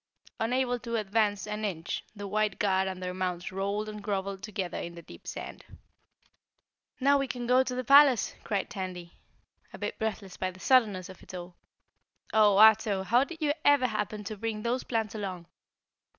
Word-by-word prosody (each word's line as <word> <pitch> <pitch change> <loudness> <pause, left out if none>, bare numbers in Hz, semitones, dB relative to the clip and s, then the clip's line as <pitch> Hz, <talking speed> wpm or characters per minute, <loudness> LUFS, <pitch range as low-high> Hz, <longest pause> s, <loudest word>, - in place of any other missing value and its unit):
Unable 245 +2 0
to 235 -1 -4
advance 205 -1 +1
an 210 0 -4
inch, 175 -5 -3
the 205 -1 -6
white 210 0 0
guard 190 -1 +2
and 185 -1 -5
their 180 0 -3
mounts 180 -1 -3
rolled 200 +3 -2
and 210 0 -7
groveled 195 -1 -3
together 190 -4 -4
in 170 0 -6
the 170 - -10
deep - - -14
sand. - - -7 1.4
"Now 280 +1 +4
we 275 - -1
can 245 -1 -4
go 250 +2 +4
on 260 - +3
to 250 - -3
the 255 - -2
palace!" 275 -2 +6
cried 200 -3 -1
Tandy, 185 -4 -7 0.5
a - - -9
bit - - -4
breathless 210 -4 -4
by 185 - -1
the 185 0 -13
suddenness 210 -7 +3
of 190 - -12
it - - -10
all. 175 0 -8 0.8
"Oh, 210 -2 +5
Ato, 215 -2 +6
how 240 +7 +4
did 320 +2 -7
you 290 -1 +3
ever 285 -3 +5
happen 215 -2 -2
to 215 +2 -5
bring 215 0 -4
those 245 +2 -1
plants 225 -3 -2
along?" 190 -5 -5
210 Hz, 185 wpm, -29 LUFS, 190-235 Hz, 1.4 s, palace